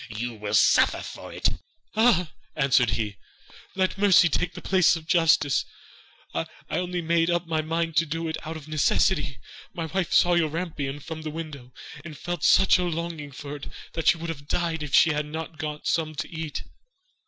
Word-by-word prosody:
You 115 Hz, +1 st, -5 dB
shall 105 Hz, 0 st, -1 dB
suffer -, -, +4 dB
for -, -, -9 dB
it!' -, -, +1 dB, 0.5 s
'Ah,' 210 Hz, -8 st, +3 dB, 0.2 s
answered 135 Hz, -5 st, +3 dB
he, 105 Hz, -3 st, -3 dB, 0.6 s
'let 190 Hz, 0 st, 0 dB
mercy 190 Hz, -4 st, +6 dB
take 180 Hz, +3 st, -1 dB
the -, -, -6 dB
place 185 Hz, -3 st, +4 dB
of 160 Hz, -1 st, -7 dB
justice, 160 Hz, -5 st, +3 dB, 0.7 s
I -, -, -2 dB, 0.2 s
only 180 Hz, -1 st, -2 dB
made 165 Hz, +1 st, +2 dB
up 175 Hz, 0 st, 0 dB
my 160 Hz, -1 st, 0 dB
mind 165 Hz, +1 st, -2 dB
to 165 Hz, -, +3 dB
do 165 Hz, +2 st, -3 dB
it 160 Hz, -, -2 dB
out 160 Hz, 0 st, -5 dB
of 155 Hz, -1 st, -12 dB
necessity. 155 Hz, -1 st, +1 dB, 0.4 s
My 165 Hz, -, -3 dB
wife 175 Hz, +2 st, -2 dB
saw 175 Hz, -, +5 dB
your 170 Hz, -2 st, +2 dB
rampion 150 Hz, -4 st, -4 dB
from 160 Hz, +2 st, -7 dB
the 155 Hz, -, -5 dB
window, 150 Hz, -5 st, -7 dB, 0.3 s
and 155 Hz, -3 st, -9 dB
felt 175 Hz, +5 st, -4 dB
such 190 Hz, -1 st, +5 dB
a -, -, +1 dB
longing 165 Hz, -3 st, -4 dB
for 140 Hz, +2 st, -7 dB
it 145 Hz, -, -9 dB, 0.3 s
that 165 Hz, -, -3 dB
she -, -, +6 dB
would 165 Hz, 0 st, -6 dB
have 145 Hz, -3 st, -6 dB
died 165 Hz, -1 st, -1 dB
if 150 Hz, -2 st, -1 dB
she 160 Hz, -, +6 dB
had 150 Hz, 0 st, -2 dB
not 160 Hz, 0 st, -6 dB
got 150 Hz, -1 st, -5 dB
some 155 Hz, -1 st, 0 dB
to -, -, -3 dB
eat. 160 Hz, -3 st, -5 dB
160 Hz, 190 wpm, -26 LUFS, 150-170 Hz, 0.7 s, mercy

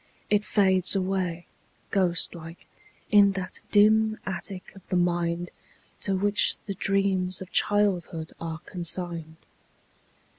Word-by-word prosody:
It 210 Hz, 0 st, +3 dB
fades 190 Hz, -3 st, +2 dB
away. 185 Hz, -3 st, -1 dB, 0.5 s
Ghost 180 Hz, -3 st, +1 dB
like, 165 Hz, 0 st, -11 dB, 0.5 s
in 200 Hz, -2 st, +6 dB
that 190 Hz, -1 st, -5 dB
dim 215 Hz, +1 st, +4 dB
attic 190 Hz, +1 st, -5 dB
of 195 Hz, -, -13 dB
the -, -, -2 dB
mind 175 Hz, -1 st, 0 dB, 0.5 s
To 195 Hz, -, -1 dB
which 205 Hz, +2 st, +2 dB
the 200 Hz, -, -3 dB
dreams 190 Hz, -2 st, 0 dB
of 190 Hz, 0 st, -9 dB
childhood 185 Hz, -6 st, 0 dB
are 165 Hz, -1 st, -4 dB
consigned. 170 Hz, -2 st, -3 dB
185 Hz, 115 wpm, -26 LUFS, 175-200 Hz, 0.5 s, in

